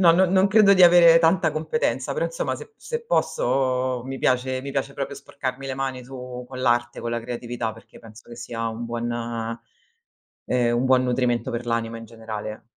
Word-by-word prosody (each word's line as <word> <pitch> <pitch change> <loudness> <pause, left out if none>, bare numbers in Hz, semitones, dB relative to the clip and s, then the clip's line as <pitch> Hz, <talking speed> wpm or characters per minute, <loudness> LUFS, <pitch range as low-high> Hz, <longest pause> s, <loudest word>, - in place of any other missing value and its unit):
No, 170 -3 +7
non 180 +1 +3
non 190 0 +5
credo 205 -1 +6
di 185 - +5
avere 170 -1 +8
tanta 165 0 +3
competenza, 310 - -1
però 485 - 0
insomma, - - -2
se 445 - -12
se 470 0 -5
posso 130 - 0
mi 135 0 -5
piace 130 0 +1
mi 140 - -5
piace 135 0 -2
proprio 140 0 -4
sporcarmi 135 -1 -6
le 135 - -3
mani 130 -1 -3
su 125 -1 -8
con 130 -1 -7
l'arte, 120 -1 +1
con 115 - -4
la 120 0 -2
creatività, 120 -1 -4
perché 115 +1 -16
penso 110 0 -15
che 120 - -10
sia 115 -1 -4
un 115 +1 -5
buon 120 0 -3 1.3
ehm, 120 -1 +1
un 120 - 0
buon 130 -1 +4
nutrimento 125 -1 0
per 120 +1 -4
l'anima 115 -1 -1
in 115 - -9
generale. 110 -1 -7
130 Hz, 190 wpm, -24 LUFS, 120-155 Hz, 1.3 s, avere